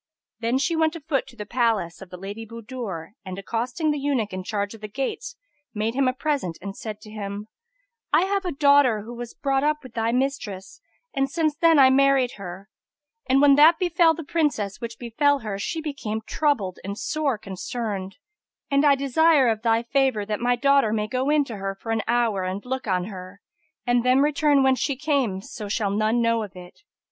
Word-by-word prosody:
Then 235 Hz, +2 st, +1 dB
she 330 Hz, +5 st, 0 dB
went 320 Hz, 0 st, +1 dB
a -, -, -5 dB
foot 280 Hz, -3 st, -1 dB
to -, -, -14 dB
the 210 Hz, -3 st, -7 dB
palace 215 Hz, -7 st, 0 dB
of 190 Hz, -, -10 dB
the 180 Hz, -, -9 dB
Lady 200 Hz, +4 st, -7 dB
Budur 225 Hz, -6 st, -7 dB
and, 185 Hz, -1 st, -7 dB
accosting 240 Hz, -, -1 dB
the 295 Hz, -, -2 dB
eunuch 265 Hz, -8 st, -1 dB
in 185 Hz, 0 st, -4 dB
charge 205 Hz, +1 st, -3 dB
of 225 Hz, -, -13 dB
the 210 Hz, -, -5 dB
gates, 275 Hz, -, -4 dB, 0.4 s
made 215 Hz, +2 st, -1 dB
him 270 Hz, 0 st, +2 dB
a 255 Hz, -, +2 dB
present 265 Hz, -, -2 dB
and 200 Hz, +1 st, -7 dB
said 215 Hz, -1 st, -7 dB
to 215 Hz, -, -12 dB
him, 205 Hz, 0 st, -6 dB, 0.6 s
"I 310 Hz, +4 st, +5 dB
have 395 Hz, +1 st, 0 dB
a 360 Hz, -, -2 dB
daughter, 280 Hz, -6 st, +4 dB
who 235 Hz, +3 st, -8 dB
was 240 Hz, -1 st, -8 dB
brought 275 Hz, -1 st, 0 dB
up 300 Hz, 0 st, 0 dB
with 255 Hz, -3 st, -12 dB
thy 230 Hz, 0 st, 0 dB
mistress 245 Hz, -7 st, -3 dB, 0.3 s
and 270 Hz, 0 st, 0 dB
since 310 Hz, 0 st, 0 dB
then 330 Hz, 0 st, +4 dB
I 265 Hz, -2 st, +7 dB
married 270 Hz, -2 st, +4 dB
her; 195 Hz, 0 st, -8 dB, 0.6 s
and, 270 Hz, +1 st, +4 dB
when 285 Hz, -1 st, +7 dB
that 315 Hz, +3 st, +7 dB
befel 345 Hz, -3 st, +3 dB
the 330 Hz, -, -6 dB
Princess 280 Hz, -, -1 dB
which 235 Hz, 0 st, -6 dB
befel 280 Hz, +4 st, +1 dB
her, 205 Hz, -3 st, -4 dB
she 320 Hz, +10 st, -3 dB
became 260 Hz, -8 st, -4 dB
troubled 240 Hz, -, 0 dB
and 200 Hz, +1 st, -5 dB
sore 295 Hz, -4 st, -1 dB
concerned, 195 Hz, 0 st, -5 dB, 0.5 s
and 280 Hz, +1 st, +3 dB
I 285 Hz, -1 st, +6 dB
desire 280 Hz, 0 st, +3 dB
of 220 Hz, -1 st, -1 dB
thy 230 Hz, 0 st, +2 dB
favour 260 Hz, -4 st, +1 dB
that 210 Hz, 0 st, -3 dB
my 245 Hz, 0 st, +2 dB
daughter 275 Hz, -3 st, +3 dB
may 215 Hz, -1 st, 0 dB
go 255 Hz, +4 st, -1 dB
in 300 Hz, -1 st, +4 dB
to 230 Hz, -5 st, -7 dB
her 195 Hz, 0 st, -4 dB
for 225 Hz, +3 st, -6 dB
an 225 Hz, -1 st, +1 dB
hour 230 Hz, -5 st, +1 dB
and 185 Hz, +4 st, -4 dB
look 260 Hz, -1 st, -4 dB
on 185 Hz, -2 st, +1 dB
her; 185 Hz, 0 st, -9 dB, 0.5 s
and 245 Hz, -1 st, +2 dB
then 250 Hz, +1 st, +4 dB
return 290 Hz, -1 st, +3 dB
whence 265 Hz, -1 st, +3 dB
she 280 Hz, -2 st, 0 dB
came, 270 Hz, -9 st, 0 dB
so 210 Hz, -1 st, -7 dB
shall 205 Hz, -1 st, 0 dB
none 215 Hz, +3 st, +1 dB
know 230 Hz, 0 st, +2 dB
of 205 Hz, -3 st, -7 dB
it." 180 Hz, -1 st, -12 dB
240 Hz, 210 wpm, -24 LUFS, 210-280 Hz, 0.6 s, I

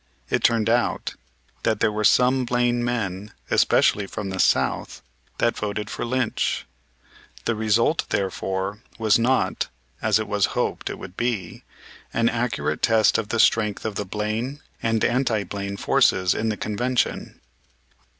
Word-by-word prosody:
It -, -, +1 dB
turned 115 Hz, -2 st, +3 dB
out 120 Hz, +1 st, +1 dB, 0.5 s
that -, -, 0 dB
there -, -, +2 dB
were 105 Hz, 0 st, -2 dB
some 125 Hz, +4 st, +4 dB
Blaine 120 Hz, 0 st, +1 dB
men, 105 Hz, -4 st, -3 dB, 0.2 s
especially 105 Hz, -1 st, +3 dB
from 100 Hz, 0 st, -5 dB
the 95 Hz, -, -5 dB
South, -, -, +1 dB, 0.3 s
that 115 Hz, -, +1 dB
voted 105 Hz, 0 st, -3 dB
for -, -, -3 dB
Lynch. 125 Hz, -1 st, -1 dB, 0.8 s
The 115 Hz, -, +1 dB
result, 110 Hz, +7 st, +1 dB
therefore, 95 Hz, +1 st, -2 dB, 0.2 s
was 110 Hz, 0 st, +3 dB
not, 125 Hz, +3 st, +1 dB, 0.3 s
as 110 Hz, -2 st, +3 dB
it 110 Hz, -, -3 dB
was 105 Hz, -2 st, +2 dB
hoped -, -, -1 dB
it -, -, -5 dB
would 90 Hz, -, -10 dB
be, 110 Hz, -7 st, -2 dB, 0.5 s
an 115 Hz, 0 st, +3 dB
accurate 90 Hz, -11 st, -1 dB
test 110 Hz, 0 st, +4 dB
of 110 Hz, -, -4 dB
the 115 Hz, -, -1 dB
strength 105 Hz, -2 st, +2 dB
of 110 Hz, -, -2 dB
the 105 Hz, -, -3 dB
Blaine 110 Hz, +7 st, -3 dB, 0.2 s
and 115 Hz, -1 st, +1 dB
anti 120 Hz, -4 st, +1 dB
Blaine 100 Hz, 0 st, -5 dB
forces 90 Hz, -2 st, +3 dB
in 110 Hz, -, -1 dB
the 105 Hz, -, -2 dB
Convention. 120 Hz, +4 st, -1 dB
110 Hz, 150 wpm, -24 LUFS, 100-120 Hz, 0.8 s, some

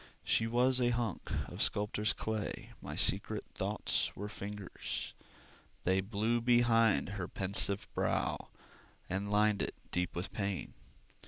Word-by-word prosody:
She 110 Hz, -, +2 dB
was 125 Hz, +2 st, +2 dB
a 120 Hz, -, +3 dB
hunk 120 Hz, -5 st, -2 dB, 0.2 s
of -, -, -6 dB
sculptor's 105 Hz, +1 st, +2 dB
clay, 110 Hz, -1 st, -4 dB
My -, -, -6 dB
secret -, -, +3 dB
thoughts -, -, 0 dB
were 105 Hz, +1 st, -5 dB
fingers: 105 Hz, -2 st, -5 dB, 0.7 s
They 95 Hz, +1 st, +2 dB
flew 110 Hz, +4 st, 0 dB
behind 115 Hz, -3 st, +3 dB
her 95 Hz, -3 st, -4 dB
pensive 100 Hz, +2 st, +4 dB
brow -, -, -1 dB, 0.6 s
And 100 Hz, +2 st, -2 dB
lined 105 Hz, 0 st, +3 dB
it -, -, -3 dB, 0.2 s
deep 90 Hz, 0 st, -1 dB
with 90 Hz, +2 st, -4 dB
pain. 100 Hz, -2 st, -3 dB
105 Hz, 130 wpm, -33 LUFS, 100-115 Hz, 0.7 s, pensive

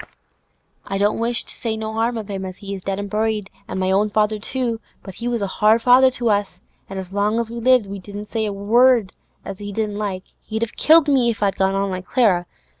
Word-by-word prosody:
I 195 Hz, -, -3 dB
don't 205 Hz, +2 st, +1 dB
wish 230 Hz, 0 st, 0 dB
to -, -, -9 dB
say 225 Hz, -2 st, -3 dB
no 220 Hz, 0 st, -4 dB
'arm 235 Hz, +1 st, 0 dB
of 215 Hz, -2 st, -5 dB
him 195 Hz, -2 st, -4 dB
as 185 Hz, 0 st, -7 dB
is 195 Hz, -1 st, -5 dB
dead 195 Hz, -1 st, -2 dB
an' 205 Hz, -, -3 dB
buried, 215 Hz, -1 st, -1 dB, 0.2 s
an' -, -, -5 dB
my 190 Hz, 0 st, 0 dB
own 205 Hz, +2 st, +2 dB
father 210 Hz, 0 st, +1 dB
too, 235 Hz, 0 st, -2 dB, 0.2 s
but 195 Hz, -, -9 dB
he 235 Hz, +6 st, -5 dB
was 235 Hz, -3 st, -1 dB
a 195 Hz, -, -5 dB
hard 220 Hz, +2 st, +5 dB
father 255 Hz, +1 st, +6 dB
to 240 Hz, -3 st, -1 dB
us, 200 Hz, -3 st, -1 dB, 0.3 s
an' 195 Hz, -, -6 dB
as 190 Hz, 0 st, -7 dB
long 205 Hz, +2 st, +1 dB
as 230 Hz, -1 st, -2 dB
he 235 Hz, +1 st, -6 dB
lived 250 Hz, -1 st, +4 dB
we 200 Hz, 0 st, -7 dB
dursn't 205 Hz, +2 st, -8 dB
say 220 Hz, -1 st, -1 dB
not -, -, -1 dB
a -, -, -4 dB
word 235 Hz, -2 st, +4 dB, 0.3 s
as 195 Hz, -1 st, -7 dB
he 205 Hz, 0 st, -6 dB
didn't 210 Hz, 0 st, -2 dB
like. 195 Hz, -3 st, -3 dB, 0.2 s
He'd 220 Hz, +1 st, -3 dB
a -, -, 0 dB
killed 315 Hz, +4 st, +5 dB
me 260 Hz, -4 st, +4 dB
if 215 Hz, -2 st, -2 dB
I'd 200 Hz, -1 st, +2 dB
gone 190 Hz, 0 st, +1 dB
on 195 Hz, 0 st, 0 dB
like 185 Hz, 0 st, -5 dB
Clara. 195 Hz, -9 st, +2 dB
210 Hz, 250 wpm, -21 LUFS, 195-230 Hz, 0.3 s, father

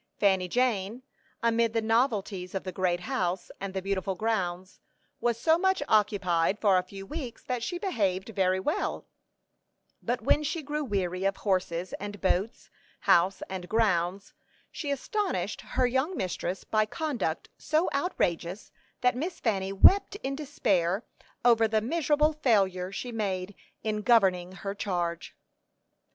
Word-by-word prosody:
Fanny 190 Hz, -3 st, +3 dB
Jane, 235 Hz, +1 st, 0 dB, 0.4 s
amid 230 Hz, -1 st, +2 dB
the 230 Hz, -, +2 dB
novelties 215 Hz, -5 st, 0 dB
of 190 Hz, -, -2 dB
the 185 Hz, -, -4 dB
great 180 Hz, -1 st, 0 dB
house, 180 Hz, 0 st, -2 dB
and 195 Hz, -1 st, -5 dB
the 190 Hz, -, -2 dB
beautiful 195 Hz, 0 st, -1 dB
grounds, 185 Hz, -4 st, -2 dB, 0.4 s
was 235 Hz, -1 st, 0 dB
so 320 Hz, +5 st, +4 dB
much 380 Hz, -3 st, +2 dB
occupied 200 Hz, -4 st, +2 dB
for 200 Hz, -4 st, +4 dB
a -, -, -3 dB
few 195 Hz, +1 st, -9 dB
weeks 260 Hz, -1 st, -6 dB
that 250 Hz, -2 st, -2 dB
she 350 Hz, +9 st, -3 dB
behaved 200 Hz, -, -1 dB
very 190 Hz, -3 st, +1 dB
well; 295 Hz, +11 st, -2 dB, 1.0 s
but -, -, -1 dB
when -, -, +3 dB
she 305 Hz, +2 st, -2 dB
grew 295 Hz, +1 st, -2 dB
weary 190 Hz, -6 st, -2 dB
of 195 Hz, 0 st, +1 dB
horses 185 Hz, -3 st, -1 dB
and 205 Hz, 0 st, -6 dB
boats, 195 Hz, +4 st, -1 dB, 0.3 s
house 185 Hz, +3 st, +3 dB
and 185 Hz, -2 st, -6 dB
grounds, 200 Hz, -3 st, +1 dB, 0.4 s
she 295 Hz, -, -5 dB
astonished 400 Hz, -, -2 dB
her 255 Hz, -, 0 dB
young 265 Hz, +8 st, 0 dB
mistress 185 Hz, 0 st, -3 dB
by 215 Hz, -1 st, +2 dB
conduct 235 Hz, -, -2 dB
so 310 Hz, +3 st, +1 dB
outrageous 185 Hz, -, -1 dB, 0.3 s
that 250 Hz, -1 st, +3 dB
Miss 325 Hz, +8 st, -3 dB
Fanny 195 Hz, -4 st, 0 dB
wept 385 Hz, -, +6 dB
in 275 Hz, +1 st, -2 dB
despair 205 Hz, -, 0 dB, 0.4 s
over 230 Hz, -2 st, +5 dB
the 220 Hz, 0 st, +2 dB
miserable 300 Hz, +4 st, +2 dB
failure 195 Hz, -10 st, +1 dB
she 240 Hz, +5 st, -5 dB
made 200 Hz, -3 st, -2 dB, 0.3 s
in 215 Hz, -1 st, -1 dB
governing 190 Hz, -6 st, +3 dB
her 195 Hz, +1 st, -5 dB
charge. 175 Hz, -4 st, -3 dB
205 Hz, 145 wpm, -28 LUFS, 185-250 Hz, 1.0 s, wept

